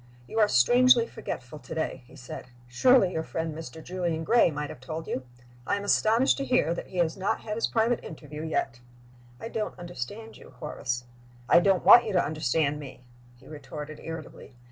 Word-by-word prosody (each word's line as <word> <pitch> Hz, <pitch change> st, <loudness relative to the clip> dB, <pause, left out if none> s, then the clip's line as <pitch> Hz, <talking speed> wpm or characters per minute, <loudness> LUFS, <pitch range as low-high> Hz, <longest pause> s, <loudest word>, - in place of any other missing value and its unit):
"You 225 Hz, -, -3 dB
are 210 Hz, -, +6 dB
strangely 245 Hz, -, +5 dB
forgetful 130 Hz, -, -7 dB
to -, -, -8 dB
day," 160 Hz, -, -3 dB
he -, -, -16 dB
said. 125 Hz, -1 st, -9 dB, 0.2 s
"Surely 195 Hz, -, +4 dB
your 160 Hz, -, -2 dB
friend 160 Hz, 0 st, -4 dB
Mr. 160 Hz, 0 st, -9 dB
Julian 175 Hz, -2 st, -2 dB
Gray 230 Hz, +3 st, +4 dB
might 150 Hz, -1 st, -4 dB
have -, -, -11 dB
told 155 Hz, +5 st, -6 dB
you? 130 Hz, -1 st, -4 dB, 0.4 s
I -, -, +2 dB
am 200 Hz, -, -4 dB
astonished 225 Hz, +5 st, +3 dB
to 275 Hz, -, -2 dB
hear 250 Hz, -11 st, +2 dB
that -, -, -6 dB
he 185 Hz, -, -9 dB
has 165 Hz, -2 st, +1 dB
not 195 Hz, 0 st, -1 dB
had 210 Hz, -, -5 dB
his 230 Hz, -, 0 dB
private 230 Hz, +1 st, +1 dB
interview 150 Hz, -1 st, -9 dB
yet." 135 Hz, -6 st, -2 dB, 0.6 s
"I -, -, -6 dB
don't 220 Hz, -2 st, -4 dB
understand 175 Hz, -, -7 dB
you, -, -, -16 dB
Horace." 125 Hz, -5 st, -4 dB, 0.4 s
"I 170 Hz, -, +7 dB
don't 190 Hz, 0 st, +2 dB
want 240 Hz, -, +9 dB
you 215 Hz, -, -3 dB
to 180 Hz, -, +3 dB
understand 150 Hz, 0 st, 0 dB
me," 135 Hz, -3 st, -10 dB, 0.3 s
he 120 Hz, -, -19 dB
retorted, 150 Hz, 0 st, -8 dB
irritably. 160 Hz, -5 st, -9 dB
165 Hz, 190 wpm, -27 LUFS, 150-210 Hz, 0.6 s, want